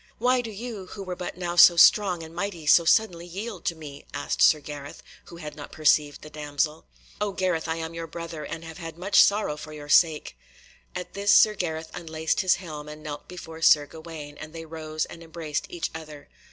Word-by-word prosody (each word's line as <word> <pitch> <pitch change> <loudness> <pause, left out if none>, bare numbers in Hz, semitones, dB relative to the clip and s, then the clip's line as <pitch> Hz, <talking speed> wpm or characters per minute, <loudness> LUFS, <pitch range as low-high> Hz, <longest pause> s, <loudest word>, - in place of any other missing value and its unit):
"Why 250 +2 +2
do 230 - -7
you, 215 -2 -7
who 200 - -8
were 185 -1 -5
but 180 -1 -6
now 175 -1 -3
so 175 0 +9
strong 180 -1 +5
and 160 0 -11
mighty, 175 -2 -4
so 170 +3 +6
suddenly 175 -2 +2
yield 200 +1 -6
to 175 -4 0
me?" 145 -3 -11
asked 145 - -2
Sir 155 - +6
Gareth, 145 0 -9 0.2
who 170 - -12
had 150 -3 -8
not 145 - -9
perceived 150 -1 +2
the 155 - -9
damsel. 150 +1 -2 0.3
"O 205 -1 0
Gareth, 180 -4 -1
I 160 - -1
am 165 0 -5
your 165 0 -5
brother, 165 -2 -7
and 160 +2 -6
have 165 +2 -9
had 165 -1 -7
much 190 +3 +5
sorrow 200 -7 +3
for 155 0 -9
your 145 -1 -9
sake." 155 - +3 0.6
At 180 0 -6
this 200 +1 +1
Sir 215 - +7
Gareth 160 -5 -4
unlaced 160 -1 -2
his 185 -2 +4
helm 155 -5 -8
and 150 0 -10
knelt 145 -1 -7
before 165 -3 -9
Sir 150 -2 +6
Gawaine, 160 -2 -10
and 155 0 -9
they 165 0 -7
rose 155 -1 -4
and 170 - -12
embraced 160 -2 -4
each 175 - -4
other. 155 -2 -10
165 Hz, 210 wpm, -26 LUFS, 155-180 Hz, 0.6 s, so